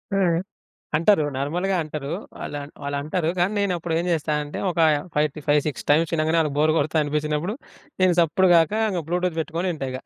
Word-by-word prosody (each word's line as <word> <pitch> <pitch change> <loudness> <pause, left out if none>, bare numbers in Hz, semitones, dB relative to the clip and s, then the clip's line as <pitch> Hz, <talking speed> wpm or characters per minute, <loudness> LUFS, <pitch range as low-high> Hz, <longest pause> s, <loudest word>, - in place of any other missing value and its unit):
ఆ! - - +2 0.8
అంటారు 165 -1 +4
నార్మల్‌గా 175 +8 -1
అంటారు. 150 -2 -5 0.3
వాళ్ళం 145 -1 -6
వాళ్ళంటారు 145 +4 -2
కానీ 180 +4 +2
నేనప్పుడు 175 -4 -1
ఏం 175 - -2
జేస్తా 155 -1 -1
అంటే, 145 - -7
ఒకా 170 -2 +2 0.3
5 150 +1 +3
ఫి 155 - -8
ఫైవ్ 145 0 +5
6 150 - -4
టైమ్స్ 160 +2 +3
ఇనంగనే 160 +2 +1
వాళ్ళకి 150 -2 -1
బోర్ 155 +1 +4
కొడతా 155 +2 -1
అనిపించినప్పుడు. 150 +6 -1 0.5
నేను 180 -2 +5
సప్పుడు 180 +3 +3
గాక 165 +4 +3 0.2
ఇంగ 175 -3 -2
బ్లూటూత్ 180 -1 -1
బెట్టుకొని 175 +2 -2
ఇంటా 135 -3 -4
ఇగ. 130 - -4
160 Hz, 180 wpm, -23 LUFS, 150-175 Hz, 0.8 s, ఫైవ్